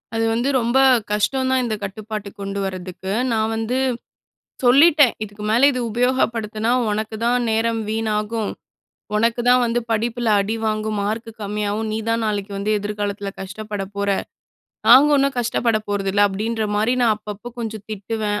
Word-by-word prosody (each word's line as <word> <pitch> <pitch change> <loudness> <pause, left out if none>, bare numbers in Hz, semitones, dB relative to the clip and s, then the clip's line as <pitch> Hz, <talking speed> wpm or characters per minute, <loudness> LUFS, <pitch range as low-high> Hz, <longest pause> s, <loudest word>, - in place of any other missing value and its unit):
அது 225 0 +1
வந்து 240 +4 0
ரொம்ப 235 +2 +1 0.3
கஷ்டம் 260 +5 +1
தான், 260 -1 +3
இந்த 220 -2 -1
கட்டுப்பாட்டுக்கு 210 +1 -6
கொண்டு 200 0 -4
வரதுக்கு. 185 0 -5 0.2
நான் 220 0 0
வந்து 225 +3 -1 0.9
சொல்லிட்டேன், 290 +1 +6
"இதுக்கு 210 0 -10
மேல 240 +5 +5
இது 255 - -2
உபயோகப்படுத்தினா, 230 -2 0 0.2
உனக்கு 215 +1 -3
தான் 240 0 +2
நேரம் 225 +1 +1
வீணாகும். 220 0 -1 0.7
உனக்கு 230 +2 +1
தான் 250 0 +5
வந்து 235 +1 0
படிப்பில 230 +1 0
அடி 215 +3 -2
வாங்கும். 215 -1 -1
மார்க்கு 220 +3 -3
கம்மியாகும். 210 +1 -2
நீ 215 - -1
தான் 230 0 +1
நாளைக்கு 205 -1 -2
வந்து 205 +2 -1
எதிர்காலத்தில 205 -1 -3
கஷ்டப்பட 205 +1 -5
போற. 200 0 -1 0.8
நாங்க 265 +5 +8
ஒன்னும் 275 -1 +1
கஷ்டப்பட 235 -1 +1
போறதில்ல." 205 0 +2
அப்படின்ற 220 +3 -2
மாதிரி 220 +4 +2
நான் 225 -2 +4
அப்பப்போ 210 +2 -8
கொஞ்சம் 220 -2 -5
திட்டுவேன். 210 0 -2
220 Hz, 145 wpm, -21 LUFS, 205-235 Hz, 0.9 s, நாங்க